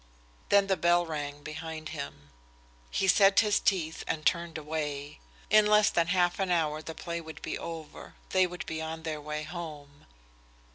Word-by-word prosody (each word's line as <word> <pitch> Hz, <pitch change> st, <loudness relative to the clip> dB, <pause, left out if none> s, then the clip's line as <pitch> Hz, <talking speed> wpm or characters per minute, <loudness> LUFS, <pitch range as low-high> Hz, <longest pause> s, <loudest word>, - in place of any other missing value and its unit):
Then 200 Hz, -1 st, +5 dB
the 190 Hz, -1 st, +1 dB
bell 175 Hz, +1 st, +3 dB
rang 145 Hz, -2 st, -5 dB
behind 155 Hz, 0 st, -6 dB
him. 75 Hz, -, -7 dB, 0.6 s
He 195 Hz, -, 0 dB
set 195 Hz, +2 st, +6 dB
his 210 Hz, -2 st, +2 dB
teeth 165 Hz, -5 st, 0 dB
and 155 Hz, -1 st, -2 dB
turned 170 Hz, -2 st, +1 dB
away. 150 Hz, -2 st, -4 dB, 0.3 s
In 215 Hz, 0 st, +7 dB
less 210 Hz, 0 st, +5 dB
than 170 Hz, -1 st, +2 dB
half 180 Hz, 0 st, +2 dB
an 190 Hz, -1 st, 0 dB
hour 155 Hz, -3 st, +1 dB
the 160 Hz, 0 st, -7 dB
play 170 Hz, +1 st, -4 dB
would 160 Hz, -1 st, -10 dB
be -, -, -3 dB
over. 160 Hz, -2 st, -8 dB
They 185 Hz, -1 st, +4 dB
would 180 Hz, 0 st, -7 dB
be 160 Hz, 0 st, -4 dB
on 160 Hz, 0 st, -5 dB
their 155 Hz, -2 st, -3 dB
way 150 Hz, +1 st, -4 dB
home. 150 Hz, -4 st, -8 dB
160 Hz, 175 wpm, -29 LUFS, 150-180 Hz, 0.6 s, In